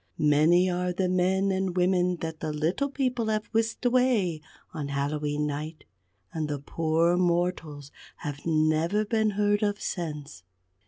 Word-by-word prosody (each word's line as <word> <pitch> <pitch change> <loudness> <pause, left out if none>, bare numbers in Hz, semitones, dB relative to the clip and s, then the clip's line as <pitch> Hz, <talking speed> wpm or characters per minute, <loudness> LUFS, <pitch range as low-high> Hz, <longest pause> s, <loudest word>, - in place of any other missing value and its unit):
Many 155 +5 +4
are 180 0 -1
the 185 +1 0
men 185 +2 +1
and 190 -1 -1
women 180 0 +2
that 160 -1 -5
the 155 - -3
Little 165 - -1
People 255 -4 -1
have 215 -1 0
whisked 225 +2 -1
away 240 -10 +2 0.3
on 150 -4 -4
Hallowe'en 145 +1 -1
Night; 150 +2 -5 0.5
and 155 -2 -2
the 145 -1 -2
poor 165 +4 +1
mortals 170 -5 -1 0.3
have 145 -1 -6
never 160 +5 +1
been 220 0 +1
heard 205 0 +2
of 205 -1 0
since. 150 - -5
175 Hz, 145 wpm, -27 LUFS, 155-200 Hz, 0.5 s, Many